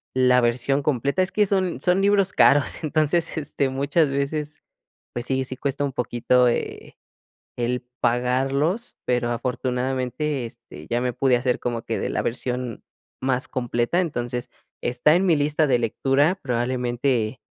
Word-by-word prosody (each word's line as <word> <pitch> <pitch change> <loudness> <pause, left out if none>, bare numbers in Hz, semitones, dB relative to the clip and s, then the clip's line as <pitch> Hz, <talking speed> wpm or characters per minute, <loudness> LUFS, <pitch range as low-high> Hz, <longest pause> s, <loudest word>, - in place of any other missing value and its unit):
la 125 -1 +5
versión 125 +4 +1
completa. 140 +4 +1
Es 185 - -3
que 210 - +3
son 190 -3 0
son 180 +1 +2
libros 200 -1 +3
caros, 145 +2 +3
entonces, 155 +2 +1
este, 140 -2 -1
muchas 140 +4 +1
veces, 150 +2 -3 0.5
pues 120 0 -5
sí, 130 0 0
sí 130 0 -7
cuesta 140 0 -2
un 140 - -2
poquito, 125 0 +2
eh, 120 - -3 0.6
el 125 +1 -1 0.2
pagarlos, 135 - 0
pero, 120 -1 +1
afortunadamente, 130 +3 -2
este, 115 0 -11
ya 120 - +1
me 125 -1 -1
pude 130 -1 +3
hacer 125 0 0
como 120 -2 -3
que - - -2
de - - -2
la - - -1
versión 125 0 -3 0.4
más 130 0 0
completa. 120 +5 0
Entonces, 120 -6 -4 0.3
está 125 +5 +3
en 185 +3 +2
mi 170 -4 +4
lista 150 +2 +1
de 130 -3 +3
lectura, 135 +7 +2
probablemente, 125 -1 -1
130 Hz, 150 wpm, -23 LUFS, 125-150 Hz, 0.6 s, la